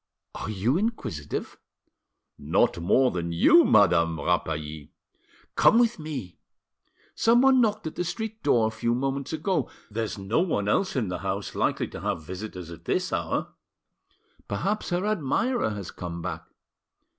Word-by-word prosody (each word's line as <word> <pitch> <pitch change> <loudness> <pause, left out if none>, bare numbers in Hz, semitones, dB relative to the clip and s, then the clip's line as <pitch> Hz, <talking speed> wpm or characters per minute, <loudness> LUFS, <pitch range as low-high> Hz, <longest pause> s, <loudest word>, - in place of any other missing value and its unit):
Are - - -5
you 110 - +1
inquisitive?" 140 - -4 0.8
"Not - - +1
more 125 +10 +3
than 85 -1 -3
you, 330 - +6
Madame 85 - +4
Rapally." 75 -1 -2 0.6
"Come - - +5
with 235 -4 +3
me. 135 - -6 0.7
Someone 250 +3 +5
knocked 215 -3 0
at 160 - -4
the - - -2
street 220 +5 -5
door 120 -6 +3
a 110 - 0
few 115 +2 -1
moments 135 +2 -2
ago; 160 +3 -1 0.2
there's 110 0 -3
no 100 +7 0
one 155 - 0
else 185 - +1
in 115 -8 0
the 90 -1 -3
douse 100 +1 -3
likely - - 0
to - - -8
have 80 - -2
visitors 90 0 -7
at 85 - -11
this - - -1
hour. - - -1 1.0
Perhaps 195 - -2
her 180 +2 0
admirer 215 - 0
has 100 -4 -6
come 85 -1 -6
back." - - -5
115 Hz, 145 wpm, -26 LUFS, -, 1.0 s, you